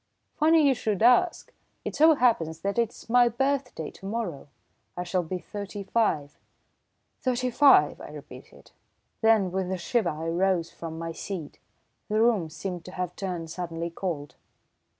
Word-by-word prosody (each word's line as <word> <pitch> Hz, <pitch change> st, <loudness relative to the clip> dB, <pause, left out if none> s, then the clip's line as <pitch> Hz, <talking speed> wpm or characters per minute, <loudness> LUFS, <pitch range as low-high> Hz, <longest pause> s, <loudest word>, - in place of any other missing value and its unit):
"Funny 315 Hz, 0 st, +4 dB
you 275 Hz, -, +5 dB
should 215 Hz, -4 st, -1 dB
ask! 250 Hz, +9 st, +3 dB, 0.3 s
It -, -, -4 dB
so 315 Hz, +1 st, +6 dB
happens 165 Hz, -, +1 dB
that 200 Hz, +5 st, -1 dB
it's 230 Hz, -1 st, -2 dB
my 245 Hz, +1 st, +5 dB
birthday 260 Hz, -, -2 dB
to 195 Hz, -, -10 dB
morrow. 195 Hz, -11 st, -4 dB, 0.5 s
I 180 Hz, -, -2 dB
shall 180 Hz, +1 st, 0 dB
be 175 Hz, +2 st, -4 dB
thirty 200 Hz, +1 st, -7 dB
five." 175 Hz, -9 st, 0 dB, 0.8 s
"Thirty 255 Hz, -1 st, -1 dB
five!" 275 Hz, +3 st, +5 dB
I -, -, -9 dB
repeated. -, -, -13 dB, 0.5 s
Then 220 Hz, -5 st, +4 dB
with 190 Hz, 0 st, -2 dB
a 190 Hz, -, -1 dB
shiver 195 Hz, +2 st, 0 dB
I 160 Hz, +2 st, -4 dB
rose 175 Hz, 0 st, +1 dB
from 165 Hz, -1 st, -7 dB
my 165 Hz, 0 st, -4 dB
seat. 165 Hz, -2 st, -7 dB, 0.5 s
The 215 Hz, +1 st, +1 dB
room 220 Hz, -8 st, +3 dB
seemed 175 Hz, +2 st, -6 dB
to 185 Hz, -, -10 dB
have 180 Hz, -1 st, -4 dB
turned 175 Hz, -5 st, -4 dB
suddenly 170 Hz, -1 st, -4 dB
cold. 155 Hz, -7 st, -4 dB
190 Hz, 155 wpm, -27 LUFS, 170-235 Hz, 0.8 s, so